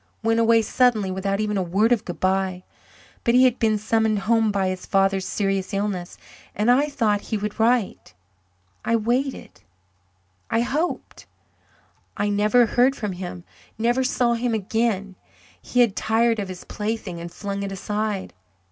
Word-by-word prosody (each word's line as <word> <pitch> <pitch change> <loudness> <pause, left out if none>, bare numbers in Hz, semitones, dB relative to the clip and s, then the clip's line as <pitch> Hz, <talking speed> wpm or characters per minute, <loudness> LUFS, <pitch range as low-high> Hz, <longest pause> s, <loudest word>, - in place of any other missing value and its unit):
Went 225 +1 +2
away 230 0 +4
suddenly 220 -6 +2
without 195 +1 -2
even 210 -1 -1
a - - +1
word 195 +6 +1
of 225 -3 +2
goodbye. 185 0 -1 0.6
But 235 - +2
he 255 - +6
had 255 -1 +3
been 220 -2 +2
summoned 220 0 +1
home 220 +2 +2
by 195 -2 0
his 185 0 -5
father's 195 -1 +1
serious 195 -1 -1
illness, 195 -3 -3 0.4
and 215 +4 +3
I 280 +4 +3
thought 215 -7 +1
he 220 - -3
would 210 +2 -5
write 230 - 0 0.7
I 230 - +1
waited 240 - -2 0.9
I 225 - +1
hoped. 300 +8 -3 0.9
I 205 - 0
never 210 +4 +4
heard 250 +4 +2
from 210 -6 -3
him 180 -1 -7 0.3
never 240 +4 +1
saw 245 -2 +1
him 235 0 -1
again. 200 -2 -1 0.4
He 250 - +1
had 230 -5 +3
tired 225 +1 +1
of 200 - -3
his 185 -1 -8
plaything 210 -5 -4
and 170 0 -7
flung 200 +1 -5
it 200 -1 -4
aside. 210 +1 -3
215 Hz, 155 wpm, -23 LUFS, 195-230 Hz, 0.9 s, he